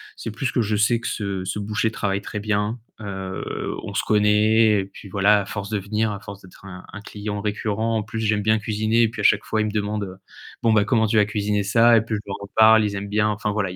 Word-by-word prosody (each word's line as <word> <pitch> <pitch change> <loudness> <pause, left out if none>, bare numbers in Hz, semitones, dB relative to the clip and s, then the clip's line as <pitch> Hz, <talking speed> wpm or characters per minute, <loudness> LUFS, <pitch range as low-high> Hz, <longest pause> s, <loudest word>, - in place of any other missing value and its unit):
c'est - - -6
plus 120 +4 -3
que 120 - +1
je 105 0 0
sais 105 +3 +2
que - - -5
ce 100 -3 -3
ce 95 - -3
boucher 105 +2 -1
travaille 100 -3 -2
très 105 - -6
bien, 105 +2 -1 0.2
heu, 95 -2 -5
on - - -8
se - - +1
connaît 105 0 +3
et - - -5
puis 100 0 -13
voilà, 105 +2 +4
à 100 - -6
force 100 -1 -5
de 105 - 0
venir, 105 +2 -1
à 100 - -5
force 100 0 -10
d'être 95 +1 -16
un 90 -1 -10
un 100 - -8
client 105 0 -5
récurrent. 110 +2 -1
En 110 - -1
plus 110 +1 -6
j'aime 105 -2 0
bien 110 0 +3
cuisiner 110 +1 0
et - - +4
puis 110 -2 -6
à - - -5
chaque 105 +1 +4
fois 110 - -1
il - - 0
me 105 - -2
demande, 105 0 -2
heu: 95 -1 -8 0.4
«Bon 115 -1 +3
bah, 105 -2 +3
comment 110 -2 +2
tu 110 - -1
vas 105 - +5
cuisiner 105 0 -1
ça?» 115 +3 +5
et - - +3
puis 110 +1 -6
je 105 - -4
leur 100 - -4
en 100 - -8
parle, 110 0 +6
ils 100 -1 -2
aiment 100 +1 -5
bien, 105 +1 +1
enfin, 105 0 -2
voilà. 100 -3 -1
Il - - -8
105 Hz, 275 wpm, -22 LUFS, 100-110 Hz, 0.4 s, parle